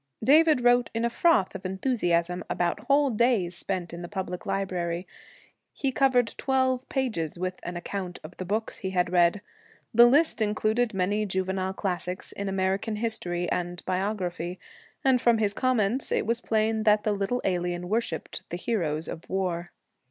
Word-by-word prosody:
David 305 +1 +5
wrote 245 0 +4
in 230 +1 +1
a 235 - 0
froth 325 - +3
of - - -7
enthusiasm 180 -4 0
about 175 +5 -1
whole 280 +1 +3
days 215 -6 +2
spent 175 -1 -3
in 170 - -6
the 175 - -6
public 185 -2 -5
library. 185 -3 -2 0.7
He 270 - -1
covered 250 -4 +2
twelve 260 -1 +1
pages 220 - -2
with 185 +1 -3
an 175 0 -5
account 180 0 -5
of 155 +3 -10
the - - -4
books 215 +5 -2
he 190 - -4
had 180 -2 0
read. 175 +2 +3 0.5
The 235 +1 +8
list 285 -1 +3
included 215 +2 +1
many 205 +3 0
juvenile 190 0 -1
classics 185 -1 -3
in 200 0 -4
American 195 +3 0
history 195 -6 -2
and 175 0 -3
biography; 185 -2 -2 0.5
and 260 -2 +4
from 235 -1 +4
his 210 -2 +1
comments 255 0 +1
it - - +1
was 230 +2 0
plain 220 -1 +1
that 210 -1 +4
the 215 - +1
little 200 +5 -1
alien 175 -1 -1
worshiped 210 -5 -2
the 175 - -4
heroes 165 -7 -1
of 160 - -8
war. 180 -2 -2
195 Hz, 165 wpm, -27 LUFS, 180-235 Hz, 0.7 s, The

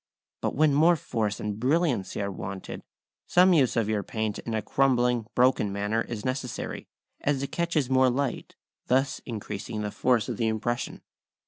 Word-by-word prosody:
But - - -1
when 150 +1 +4
more 165 +5 +5
force 110 -8 -2
and 105 0 -4
brilliancy 130 - +1
are 100 - -2
wanted, 95 0 -6 0.5
some 180 +1 +5
use 140 -7 +3
of 115 -3 +1
your 110 -1 0
paint 110 +1 -3
in 115 - -4
a 110 - 0
crumbling, 125 -4 +2
broken 125 -5 +3
manner 105 +3 0
is 110 -3 -5
necessary, 130 -2 -4 0.3
as 140 -1 0
it 140 - -4
catches 170 -5 0
more 130 0 +4
light, 130 +1 -2 0.3
thus 135 +2 +2
increasing 105 -1 -5
the 105 - -3
force 125 -1 +1
of 120 -4 -3
the 115 - +1
impression. 110 +2 -2
120 Hz, 165 wpm, -27 LUFS, 110-135 Hz, 0.5 s, more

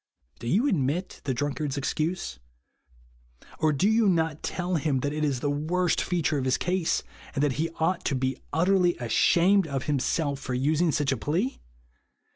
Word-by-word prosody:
Do 115 - -7
you 220 - +2
admit 170 - -1
the 135 - 0
drunkard's 145 +1 -2
excuse? 155 - -2 1.2
Or 155 - +3
do 150 +7 +2
you 220 -1 +4
not 160 -3 0
tell 180 -1 -2
him 140 -4 0
that 145 +2 -1
it 155 0 -2
is 135 -4 0
the 145 - 0
worst 170 +5 0
feature 165 -4 0
of 130 - -2
his 130 - +2
case, 180 -2 0 0.3
and 140 - +1
that 145 - +2
he 165 - 0
ought 175 +3 +1
to 140 - +1
be 130 +1 -1
utterly 175 +2 +3
ashamed 175 - +3
of 135 -3 -3
himself 145 0 0
for 130 -2 -4
using 155 +6 +2
such 145 -1 0
a 135 - 0
plea 170 - -1
155 Hz, 175 wpm, -27 LUFS, 140-175 Hz, 1.2 s, you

